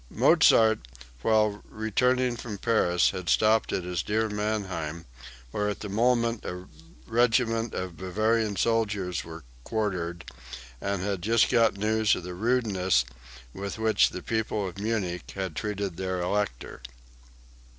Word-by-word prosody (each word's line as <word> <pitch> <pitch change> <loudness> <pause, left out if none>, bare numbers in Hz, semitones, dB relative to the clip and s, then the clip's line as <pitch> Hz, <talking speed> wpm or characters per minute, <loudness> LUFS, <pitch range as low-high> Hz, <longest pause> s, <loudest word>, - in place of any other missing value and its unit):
Mozart, 110 -1 +5 0.4
while 105 - +2
returning 125 +3 +1
from 115 -3 -6
Paris, 90 -5 +2
had 90 -2 -5
stopped 110 +1 +3
at 90 - -1
his 90 -1 -2
"dear 110 +1 0
Mannheim," 95 -7 -3 0.5
where 105 +7 -1
at 105 - -5
the 105 - -5
moment 115 +2 +1
a 90 +1 -6 0.4
regiment 115 -1 +1
of 90 -2 -5
Bavarian 110 +3 0
soldiers 100 -6 0
were 80 -1 -10 0.2
quartered, 90 - -2 0.6
and 100 -2 -2
had 100 -2 -2
just 115 +4 +3
got 115 -4 +3
news 110 +1 +2
of - - -6
the 90 +1 -6
rudeness 95 - +1 0.5
with 100 +2 -5
which 110 0 +3
the 90 - -7
people 110 -3 -1
of 95 +2 -8
Munich 100 -5 -3
had 95 -5 -4
treated 100 -3 -3
their 95 -1 -2
Elector.) 90 -8 -2
105 Hz, 135 wpm, -27 LUFS, 90-110 Hz, 0.6 s, Mozart